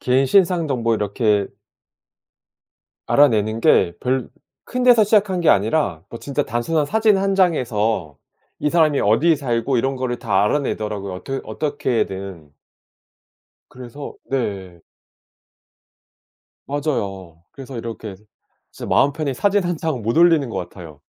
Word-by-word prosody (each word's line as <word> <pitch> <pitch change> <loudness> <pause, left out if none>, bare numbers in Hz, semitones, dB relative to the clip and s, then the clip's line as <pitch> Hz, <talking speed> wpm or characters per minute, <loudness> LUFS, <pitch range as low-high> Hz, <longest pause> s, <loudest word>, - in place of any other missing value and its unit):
개인 130 +2 +2
신상 175 +2 +3
정보 120 -5 0
이렇게 105 -1 0 1.6
알아내는 110 -6 +3
게 85 -5 +4
별 130 0 -1 0.4
큰 250 0 -2
데서 240 -4 +6
시작한 205 -3 +2
게 170 - -1
아니라 100 - +1
뭐 115 - -8
진짜 140 -2 -2
단순한 145 +7 -1
사진 215 +4 +2
1 195 0 0
장에서 115 - 0 0.4
이 150 - 0
사람이 155 -3 +3
어디에 145 +10 +3
살고 125 -1 -1
이런 135 +3 0
거를 125 -2 -3
다 100 -5 +1
알아내더라고요 105 -6 -2
어뜨 135 +9 -5
어떻게든. 100 - -3 1.2
그래서 130 +3 -9 0.2
네. 95 -9 -3 1.9
맞아요. 100 - -4
그래서 135 -2 -9
이렇게 115 -3 -7 0.6
진짜 - - -7
마음 140 - +3
편히 145 -3 -3
사진 200 +8 +1
1 175 -1 -2
장 155 -6 -3
못 115 +7 -1
올리는 165 -7 +4
것 - - -5
같아요. 85 -5 -9
130 Hz, 265 characters per minute, -20 LUFS, 105-155 Hz, 1.9 s, 데서